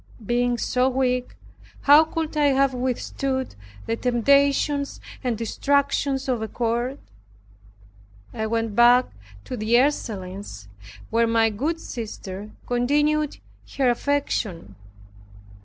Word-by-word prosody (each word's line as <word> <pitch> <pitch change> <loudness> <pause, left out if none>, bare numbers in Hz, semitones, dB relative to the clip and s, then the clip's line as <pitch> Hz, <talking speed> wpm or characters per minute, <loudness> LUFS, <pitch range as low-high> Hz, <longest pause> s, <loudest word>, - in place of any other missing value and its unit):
Being 245 +2 +1
so 250 +2 +1
weak, 250 -1 -1 0.5
how 295 +3 +7
could 320 0 -4
I 300 -1 +3
have 275 -1 +3
withstood 260 +1 -2 0.3
the 230 - -1
temptations 280 +4 +2 0.2
and 245 -3 -1
distractions 275 +3 0
of 250 -4 0
a 220 - -2
court? 240 +3 -2 1.4
I 220 - -2
went 225 -1 -2
back 245 +2 +5 0.3
to - - -6
the 220 +1 +1
Ursulines 195 - -3 0.4
where 230 +1 +3
my 225 -1 +3
good 300 +11 -2
sister 210 - -7 0.2
continued 295 +5 +1 0.4
her 260 -3 +3
affection. 240 -9 -2
250 Hz, 105 wpm, -24 LUFS, 230-280 Hz, 1.4 s, how